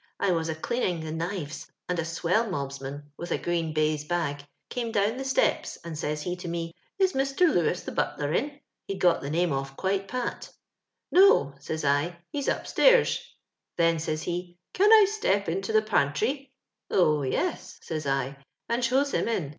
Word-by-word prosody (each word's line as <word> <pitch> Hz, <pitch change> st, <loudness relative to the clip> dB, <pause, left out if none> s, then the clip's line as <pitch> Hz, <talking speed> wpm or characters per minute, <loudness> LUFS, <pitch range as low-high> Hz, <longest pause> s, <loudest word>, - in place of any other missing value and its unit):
I 200 Hz, -, +2 dB
was 165 Hz, -2 st, 0 dB
a 160 Hz, -, -2 dB
ftleantng 175 Hz, -2 st, -1 dB
the 155 Hz, -, -5 dB
kniTes, 165 Hz, -1 st, -4 dB, 0.2 s
and 180 Hz, -1 st, -1 dB
a -, -, +2 dB
twellmohaman, 150 Hz, -, -2 dB
with 175 Hz, 0 st, -6 dB
a -, -, +2 dB
green>haiae 155 Hz, -3 st, -1 dB
hag, 155 Hz, -5 st, -1 dB, 0.3 s
oome 235 Hz, -2 st, -2 dB
down 210 Hz, +2 st, +1 dB
the 270 Hz, -, -3 dB
stepe, 265 Hz, 0 st, +1 dB
and 170 Hz, -2 st, -6 dB
says 150 Hz, 0 st, -3 dB
he 180 Hz, -, -2 dB
to 180 Hz, -, -7 dB
me, 165 Hz, 0 st, -3 dB
* -, -, -42 dB
Is 380 Hz, -1 st, +3 dB
Mr. 270 Hz, +3 st, -1 dB
Lewis, 180 Hz, -, +3 dB
the -, -, -5 dB
hatler, 145 Hz, +1 st, -1 dB
in?— 285 Hz, +2 st, -2 dB, 0.3 s
he'd 195 Hz, -, -3 dB
got 175 Hz, -2 st, +3 dB
tiie 140 Hz, -, -4 dB
name 170 Hz, 0 st, +1 dB
off 135 Hz, 0 st, -4 dB
qiike 195 Hz, +1 st, -1 dB
pat 250 Hz, +1 st, -4 dB, 0.3 s
* -, -, -58 dB
No,' 365 Hz, -, +6 dB
says 155 Hz, +2 st, -4 dB
I, 145 Hz, +5 st, +1 dB
'he's 285 Hz, -2 st, -1 dB
up -, -, -1 dB
stairs; -, -, +4 dB, 0.3 s
' -, -, -59 dB
then 165 Hz, -1 st, +3 dB
says 155 Hz, 0 st, -2 dB
he, 175 Hz, 0 st, -4 dB, 0.2 s
*Can 410 Hz, +3 st, +4 dB
i 435 Hz, -2 st, +9 dB
step 290 Hz, -, 0 dB
into 195 Hz, +5 st, -2 dB
the 215 Hz, 0 st, +4 dB
pan 140 Hz, -10 st, +2 dB
trwf 270 Hz, -, -1 dB, 0.2 s
' -, -, -59 dB
Oh, 155 Hz, -5 st, +3 dB
yes,* 130 Hz, -, -2 dB
says 155 Hz, -3 st, -4 dB
I, 135 Hz, 0 st, -1 dB, 0.3 s
and 235 Hz, +1 st, 0 dB
shows 270 Hz, +4 st, +2 dB
him -, -, 0 dB
in. 185 Hz, -11 st, -1 dB
175 Hz, 195 wpm, -27 LUFS, 155-230 Hz, 0.3 s, i